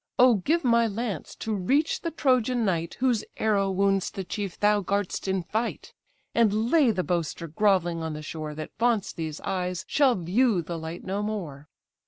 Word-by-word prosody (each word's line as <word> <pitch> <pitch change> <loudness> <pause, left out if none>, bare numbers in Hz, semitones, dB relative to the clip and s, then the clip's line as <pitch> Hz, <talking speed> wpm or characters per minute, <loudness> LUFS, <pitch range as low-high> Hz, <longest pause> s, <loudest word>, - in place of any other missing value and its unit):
O 250 0 +7
give 320 - +1
my 235 -2 +4
lance 210 -5 -4
to 220 - -3
reach 265 - +1
the 335 - -2
Trojan 255 -6 +1
knight, 170 -3 -1
Whose 245 -5 +2
arrow 205 -3 +2
wounds 195 0 +1
the 195 - -5
chief 195 0 -5
thou 210 0 +3
guard'st 200 0 -2
in 190 -1 0
fight; 220 +7 -3 0.4
And 225 +1 +2
lay 310 -7 +5
the 190 -5 0
boaster 170 -2 -2
grovelling 175 -1 +1
on 160 -1 -3
the 150 0 -7
shore, 155 -1 -6
That 155 0 -6
vaunts 230 -4 +1
these 160 -2 -5
eyes 180 -2 -2
shall 275 -4 +3
view 190 +2 +2
the 170 +1 -5
light 160 +2 -7
no 195 +2 -2
more." 170 -10 -5
200 Hz, 180 wpm, -26 LUFS, 175-230 Hz, 0.4 s, O